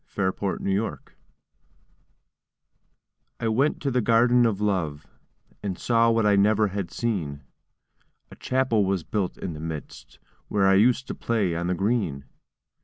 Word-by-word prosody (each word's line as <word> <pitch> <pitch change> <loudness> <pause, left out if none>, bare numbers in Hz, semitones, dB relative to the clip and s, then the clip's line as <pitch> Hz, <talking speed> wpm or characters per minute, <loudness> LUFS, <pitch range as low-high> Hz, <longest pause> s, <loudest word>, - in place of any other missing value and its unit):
THE 95 -2 +1
GARDEN 100 -1 -3
OF - - 0
LOVE 110 - -7 2.2
I 115 - -1
went 135 +7 +1
to 140 - 0
the 125 0 +1
Garden 120 +2 +4
of 105 -3 -2
Love, 85 -8 -1 0.6
And 100 -3 -4
saw 115 -1 +2
what 115 -1 +2
I 105 -1 +4
never 105 +1 +3
had 95 -2 -4
seen; 85 -10 -3 0.9
A - - -11
Chapel 130 -5 +1
was 95 -3 -1
built 95 +1 -2
in 90 - -5
the 75 - -8
midst, 80 -1 -8 0.3
Where 100 -2 +1
I 95 - +5
used 120 +6 +3
to - - -5
play 105 -7 -1
on 85 +1 -2
the 90 - 0
green. 95 - -1
100 Hz, 155 wpm, -25 LUFS, 90-115 Hz, 2.2 s, I